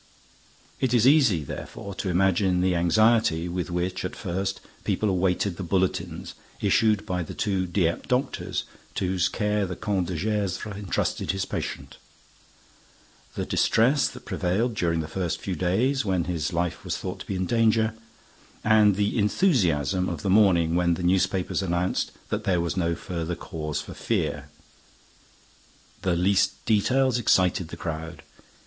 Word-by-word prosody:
It 125 -2 +1
is 120 -1 +4
easy, 130 - +5
therefore, 100 +8 -7
to 95 - -3
imagine 90 0 +2
the 90 0 +2
anxiety 90 -1 +3
with 90 +1 -3
which, 90 +1 -2
at 90 - -4
first, 95 +1 -3 0.2
people 105 - 0
awaited 90 0 0
the - - -5
bulletins 95 +1 -1 0.3
issued 105 -2 +2
by 90 -3 -2
the 85 - -7
two 95 -3 0
Dieppe 85 -2 0
doctors 125 +2 -1 0.3
to - - -1
whose 90 -1 +1
care 105 -2 0
the 90 - -5
Comte 95 -3 -1
de 90 - -3
Gesvres 105 +1 -2
entrusted 100 -2 -2
his 95 0 0
patient; - - -5 1.4
the - - -2
distress 130 +6 +3
that - - -10
prevailed 105 +7 0
during 85 -5 0
the 80 - -5
first 85 +1 -2
few 95 - -3
days, 115 - +1
when 95 -4 0
his 85 -1 -2
life 85 0 -2
was - - -2
thought - - -5
to - - -9
be 100 - -3
in 95 0 -1
danger; 110 +1 +2 0.7
and 105 -2 +5
the 105 +3 0
enthusiasm 95 - +2
of 80 -4 -5
the 95 - +1
morning 90 -5 +4
when 85 0 +2
the 90 - -5
newspapers 95 +1 +1
announced 90 -1 -1 0.2
that 105 +1 -2
there 95 -4 +1
was 85 -1 -1
no 85 -2 0
further 85 -1 -4
cause 75 -3 -4
for - - -9
fear. - - -2 1.5
The 90 -2 +1
least 95 +2 +1
details 125 +4 +2
excited 90 -5 +2
the - - -9
crowd. 80 +1 -6
95 Hz, 155 wpm, -26 LUFS, 85-105 Hz, 1.5 s, easy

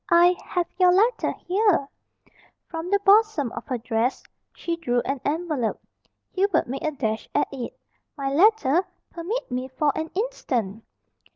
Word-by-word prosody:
I 350 +1 +6
have 355 -1 -1
your 365 -1 +6
letter 445 +6 +2 0.2
here 370 -6 +2 0.4
" - - -32
From 330 +1 -4
the 405 - +4
bosom 400 - +4
of - - -8
her 255 - -1
dress 235 +1 -1 0.3
she 340 - -3
drew 245 -7 0
an 270 +1 -3
envelope. 300 -7 -1 0.5
Hubert 395 +2 +2
made 265 +3 -5
a 310 - +1
dash 225 -7 -3
at 290 - +3
it. 255 -4 -6 0.4
"My 275 -1 -2
letter? 370 -2 +4 0.3
Permit 355 - -4
me 250 +1 -2
for 280 +2 0
an 320 0 -3
instant!" 245 - -2
320 Hz, 155 wpm, -24 LUFS, 260-370 Hz, 0.5 s, I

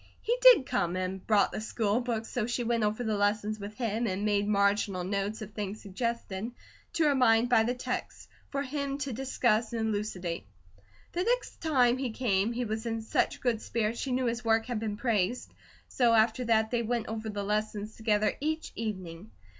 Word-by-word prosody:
He 475 - 0
did - - +8
come, 180 -10 0
and 185 +1 -3
brought 210 -2 +4
the - - -4
school 220 0 0
books 230 -2 -2
so 235 -3 -2
she 245 0 -1
went 230 -1 +1
over 210 +3 0
the 220 -2 0
lessons 210 +1 0
with 205 +1 -7
him, 230 -1 -1
and 195 +1 -2
made 205 -1 +1
marginal 200 -2 +2
notes 200 +3 -2
of 210 0 -10
things 205 0 -4
suggested 220 0 -3 0.4
to 330 - +2
her 295 -2 +4
mind 240 -2 +4
by 240 -3 +5
the 240 +3 0
text, 250 - -5 0.2
for 280 0 -2
him 280 0 -3
to 280 -3 -3
discuss 240 -3 +1
and 220 -1 0
elucidate. 185 - -3 0.6
The 350 - -1
next - - -1
time 255 -6 +3
he 265 -2 -1
came, 220 -3 +1
he 240 +1 -2
was 220 +1 -3
in 225 -1 -2
such - - 0
good 235 -3 0
spirits 230 0 -1
she 270 - -2
knew 255 0 +1
his 235 0 -1
work 225 -1 +2
had 245 -3 -2
been 215 -2 -3
praised, 230 -1 0 0.3
so 240 -3 +3
after 225 +3 +3
that 220 -1 +2
they 240 -1 +1
went 235 0 -1
over 220 0 -4
the 205 -1 -3
lessons 210 +1 -2
together 215 -1 +1
each 315 +2 -2
evening. 190 -4 -5
220 Hz, 195 wpm, -29 LUFS, 210-245 Hz, 0.6 s, did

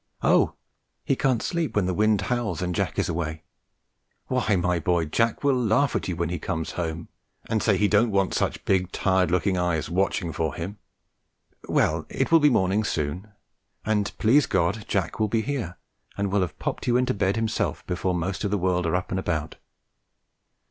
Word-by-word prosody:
Oh! - - +3 0.5
he 135 - +1
can't 130 -3 +1
sleep 165 -8 -2
when 105 -3 +2
the 90 - 0
wind 105 +2 +2
howls, 120 -6 -2
and 90 0 -1
Jack - - -2
is - - +1
away! 80 -1 -3 0.9
Why, 125 -5 +1
my 90 -1 +1
boy, 85 0 +1
Jack 115 - 0
will 140 -1 +4
laugh 125 +2 +2
at - - -1
you 90 - -2
when 85 0 -1
he 90 -1 -3
comes 80 -1 -3
home, 80 -1 -4 0.4
and 110 -1 0
say 100 -4 +3
he 105 - +3
don't 110 +3 +3
want 100 -2 +1
such - - -1
big, 90 -1 +1
tired 95 -2 +2
looking 90 +1 +1
eyes 85 -3 -1
watching 90 -2 0
for 80 -2 -2
him! 95 +5 -6 0.9
Well, - - +1
it - - -1
will 165 - +7
be 150 -1 +5
morning 100 -3 +2
soon, 85 +1 -2 0.6
and, 105 -1 +1
please 130 +6 +4
God, 100 +5 0
Jack 95 -1 -1
will 110 - +2
be 110 +1 0
here, 120 - -3 0.4
and 100 -1 -1
will 100 0 +2
have 90 -5 -3
popped - - -4
you 120 0 +4
into 125 0 +1
bed 100 -1 0
himself 110 -1 -1
before 90 +1 -1
most 90 +4 -2
of 100 - 0
the 105 - +1
world 90 -1 0
are 80 - +1
up 90 - -2
and 95 - 0
about." 80 -4 -3
95 Hz, 195 wpm, -25 LUFS, 90-110 Hz, 0.9 s, will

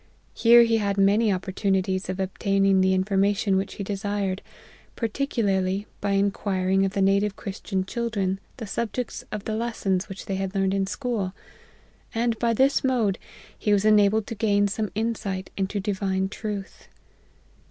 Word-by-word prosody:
Here 235 0 +7
he 230 -1 +2
had 200 -2 -1
many 205 +3 +4
opportunities 190 0 -1
of 185 +1 -3
obtaining 195 0 +2
the 190 0 +3
information 195 +1 +1
which 190 +1 -1
he 200 - -4
desired, 200 -1 -2 0.5
par 230 - -1
ticularly 205 -6 0
by 200 -1 -1
inquiring 195 -1 +1
of 195 - -2
the 195 - +1
native 200 +1 +2
Christian 190 -2 -4
chil* 235 +4 -2
dren 195 -3 -1 0.2
the 230 - -5
subjects 235 +3 -3
of 215 -2 -4
the 220 - -3
lessons 215 -5 -1
which 195 0 -8
they 195 - -2
had 195 0 -3
learned 195 0 +1
in 195 -1 0
school: 210 -4 -2 0.8
and 230 -1 0
by 235 -1 +2
this 265 +5 +3
mode, 235 -7 +1 0.4
he 210 - -1
was 205 0 +2
enabled 210 0 +4
to - - -5
gain 205 -2 +2
some 210 +1 -2
insight 215 -4 -2
into 195 +1 -1
Divine 190 -1 -1
Truth. 205 -2 -6
200 Hz, 160 wpm, -25 LUFS, 190-220 Hz, 0.8 s, Here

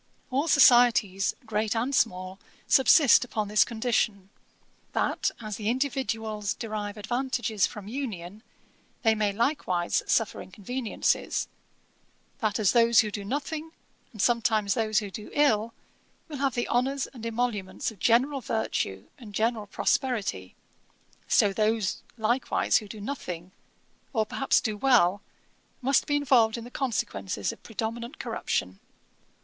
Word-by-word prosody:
All 275 +5 0
societies, 240 - +5
great 220 0 -1
and 245 +5 -1
small, 185 -5 0 0.3
subsist 275 0 +6
upon 215 -4 -3
this 210 0 +5
condition; 220 -4 -1 0.6
that - - 0
as 215 -3 -6
the 210 0 -2
individuals 225 -5 -2
derive 215 -2 -5
advantages 235 -1 -1
from 205 -2 -10
union, 210 -6 -6 0.6
they 225 -1 +5
may 210 -2 0
likewise 200 - 0
suffer 225 -3 +1
inconveniences; 220 +5 -2 0.9
that 215 -2 0
as 215 -4 +3
those 235 -1 +5
who 215 -1 -4
do 205 -1 -5
nothing, 300 +7 -4 0.4
and 215 - -14
sometimes 220 -2 +2
those 215 -3 0
who 205 -2 0
do 210 +2 -8
ill, 230 -7 +2 0.6
will 300 -3 -7
have 270 -2 0
the 240 - -1
honours 265 +2 0
and 235 -4 -11
emoluments 230 -4 -2
of 210 - -16
general 260 +6 +2
virtue 100 - -2
and 210 -4 -11
general 220 -1 0
prosperity, 200 - -1 0.7
so 200 -1 +3
those 215 -1 0 0.2
likewise 235 +3 +1
who 215 - -5
do 210 +2 -9
nothing, 185 -7 -6 0.6
or 220 -3 +1
perhaps 270 +5 +1
do 220 -3 -2
well, 205 -5 +3 0.6
must 270 +1 +2
be 290 - +1
involved 250 -6 +3
in 230 - -7
the 240 - -11
consequences 100 - -2
of - - -13
predominant 235 +4 -5
corruption.' 95 - -3
225 Hz, 135 wpm, -27 LUFS, 205-250 Hz, 0.9 s, subsist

